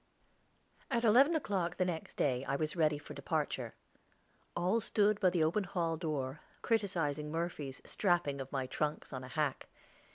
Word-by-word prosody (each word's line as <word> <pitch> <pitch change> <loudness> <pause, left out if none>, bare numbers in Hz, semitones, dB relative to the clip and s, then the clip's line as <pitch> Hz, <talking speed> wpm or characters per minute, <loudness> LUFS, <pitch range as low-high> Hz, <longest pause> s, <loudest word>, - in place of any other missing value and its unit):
At 235 -4 +1
eleven 260 +9 +6
o'clock 190 - -1
the 185 - +2
next 170 -3 -4
day 130 -2 +1
I 135 - 0
was 155 +2 -1
ready 155 -3 +3
for 145 - -9
departure. - - -2 0.8
All 185 +7 +2
stood 210 -1 +2
by 185 - +5
the 175 -3 +2
open 170 +7 +2
hall 175 -3 -1
door, 150 -3 -3 0.2
criticising 165 - 0
Murphy's 160 -5 -3
strapping 175 -8 +1
of 135 - -7
my 135 -2 -1
trunks 150 +3 -2
on 130 0 -4
a - - -7
hack. 140 +1 -1
165 Hz, 160 wpm, -34 LUFS, 145-190 Hz, 0.8 s, eleven